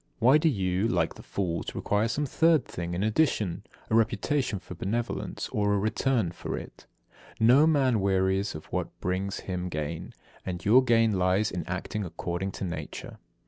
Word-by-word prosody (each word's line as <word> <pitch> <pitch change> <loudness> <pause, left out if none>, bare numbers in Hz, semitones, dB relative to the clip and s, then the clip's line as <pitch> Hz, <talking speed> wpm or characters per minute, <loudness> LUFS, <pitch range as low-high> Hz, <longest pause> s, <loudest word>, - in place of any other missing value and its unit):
Why 130 +6 +5
do 160 +1 +3
you, 95 -4 0
like 120 - +1
the - - -12
fools, 85 -4 -3
require 105 +2 +1
some 145 +6 -1
third 160 +1 +3
thing 85 0 -5
in 95 - -1
addition 110 - +1 0.3
a - - -4
reputation 115 +2 +1
for 90 - -9
benevolence 110 +7 -3
or 100 0 +1
a - - +2
return 110 -1 +1
for - - -5
it. - - -10 0.5
74. 110 - +3
No 150 +3 +6
man 135 -7 +3
wearies 95 0 +1
of 75 - -8
what - - -3
brings 95 +2 -2
him 90 -1 -4
gain, 75 0 -5 0.3
and 90 -1 -5
your 125 +6 +6
gain 115 -5 +3
lies 95 +4 +2
in 90 - -3
acting 95 +4 -3
according 90 +2 -3
to - - -6
nature. 80 -5 -6
100 Hz, 175 wpm, -28 LUFS, 90-115 Hz, 0.5 s, No